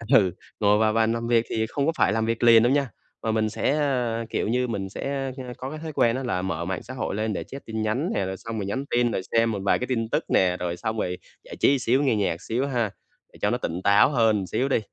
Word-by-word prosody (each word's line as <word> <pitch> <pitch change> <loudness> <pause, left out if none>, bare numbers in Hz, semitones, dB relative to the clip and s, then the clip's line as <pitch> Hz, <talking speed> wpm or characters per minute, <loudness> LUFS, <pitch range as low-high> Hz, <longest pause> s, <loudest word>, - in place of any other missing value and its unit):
ừ, 95 -6 +5 0.3
ngồi 105 0 +4
vào 110 0 +2
bàn 115 0 +2
làm 115 0 -3
việc 115 -1 +3
thì 110 0 0
không 140 +2 -1
có 165 - +3
phải 95 - +3
làm 110 0 0
việc 115 +1 -1
liền 115 -1 +7
đâu 120 - +3
nha, 140 -2 +1 0.3
mà 110 - 0
mình 110 -1 +1
sẽ, 135 - 0
ờ, 125 -6 0
kiểu - - -1
như, 125 +3 +1
mình 100 -4 -3
sẽ, 135 +5 -3
ơ, 125 -1 -6
có 130 - -5
cái 155 +2 -7
thói 155 -1 -6
quen 115 -2 +3
đó 135 - -3
là 105 -8 -1
mở 85 -3 -3
mạng 95 0 -3
xã 130 +4 -8
hội 120 - -3
lên 110 0 -1
để - - -3
check 135 - -10
tin 110 -1 -4
nhắn 125 - 0
nè, 95 - 0
rồi 95 0 -4
xong 115 +2 -6
rồi 100 - -3
nhắn 130 +8 -3
tin, 120 -1 +2
rồi 95 - -1
xem 115 0 +3
một 100 - -3
vài 100 - +2
cái 125 - -3
tin 115 -3 -1
tức - - 0
nè, 90 -1 +3
rồi 90 -1 -3
xong 110 +3 -3
rồi 90 -2 -2 0.3
giải - - -10
trí 140 0 +3
xíu 130 +4 +2
nghe 130 -6 +2
nhạc 95 -5 -1
xíu 125 +5 -1
ha, 120 -5 0 0.4
để - - -16
cho - - +2
nó - - 0
tỉnh 85 +3 -4
táo 100 +7 +5
hơn 115 -6 +3
một 95 - -3
xíu 135 +2 0
đi, - - +3
115 Hz, 290 wpm, -25 LUFS, 105-130 Hz, 0.4 s, liền